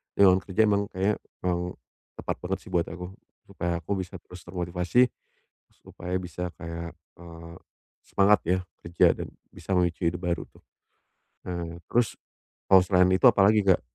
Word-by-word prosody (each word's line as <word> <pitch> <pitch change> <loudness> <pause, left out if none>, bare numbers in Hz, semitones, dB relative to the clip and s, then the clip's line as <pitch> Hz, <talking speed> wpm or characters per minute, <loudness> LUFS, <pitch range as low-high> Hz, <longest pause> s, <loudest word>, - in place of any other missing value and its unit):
di 100 - +6
ruang 95 0 +4
kerja 110 +3 +2
emang 100 -1 +1
kayak 95 +3 0 0.2
emang 90 0 -2 0.4
tepat - - -3
banget - - -1
sih - - -9
buat 85 -1 +1
aku. 90 +1 -7 0.4
Supaya 85 0 -3
aku 85 - -8
bisa 95 0 -6
terus 90 +1 -13
termotivasi 90 +7 +1 0.6
supaya 90 +1 -7
bisa 90 0 -5
kayak, 85 0 -6 0.3
eee, 85 -1 -11 0.5
semangat 100 +1 +4
ya 90 +1 +2 0.2
kerja 85 0 +3
dan - - -7 0.2
bisa - - -8
memicu 85 -1 +1
hidup 90 +1 -7
baru 85 -1 -1
tuh. - - -22 0.9
Nah 85 -1 -4
terus, 120 -2 +1 0.5
kalau 95 - +9
selain 90 -1 +4
itu 95 - +1
apalagi, 105 +2 +5
Kak? 95 -3 +5
90 Hz, 155 wpm, -27 LUFS, 85-95 Hz, 0.9 s, kalau